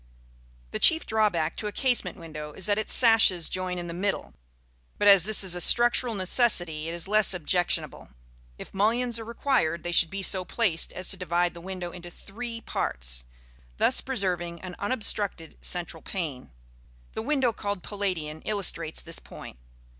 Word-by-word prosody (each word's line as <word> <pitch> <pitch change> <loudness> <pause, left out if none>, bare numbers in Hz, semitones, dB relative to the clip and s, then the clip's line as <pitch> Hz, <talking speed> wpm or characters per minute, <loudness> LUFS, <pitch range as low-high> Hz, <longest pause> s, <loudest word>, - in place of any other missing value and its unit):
The - - -3
chief 320 0 +7
drawback 200 -8 0
to 210 - -3
a - - -4
casement 250 0 0
window 155 -3 -9
is 190 - -1
that 205 0 +2
its 215 - -4
sashes 220 -8 +4
join 185 -1 -3
in 175 - -5
the 170 - -6
middle; 195 - -3 0.6
but 205 - +1
as 195 -3 +7
this 215 -1 +7
is 185 -2 +4
a 175 - -2
structural 240 +1 +4
necessity, 180 -6 +1
it - - -4
is 170 +2 -1
less 210 -2 +4
objectionable. 175 - -1 0.5
If - - -11
mullions 230 +4 0
are - - -6
required, 230 - -1
they 175 - -4
should 170 -1 +4
be 195 +2 -5
so 185 -1 +2
placed 180 -3 0
as 185 - -2
to 195 - -2
divide 175 -1 -1
the 170 - -11
window 185 -1 -6
into 175 0 -11
three 230 +6 -8
parts, - - -3 0.5
thus - - +4
preserving 180 -8 -2
an 185 -1 -8
unobstructed 205 -7 -2
central 170 -2 -2
pane. 150 - -6 0.6
The - - -4
window 265 -2 0
called 200 -3 -5
Palladian 180 -7 -4
illustrates 175 -6 -2
this 165 0 -5
point. - - -12
185 Hz, 170 wpm, -26 LUFS, 170-215 Hz, 0.6 s, chief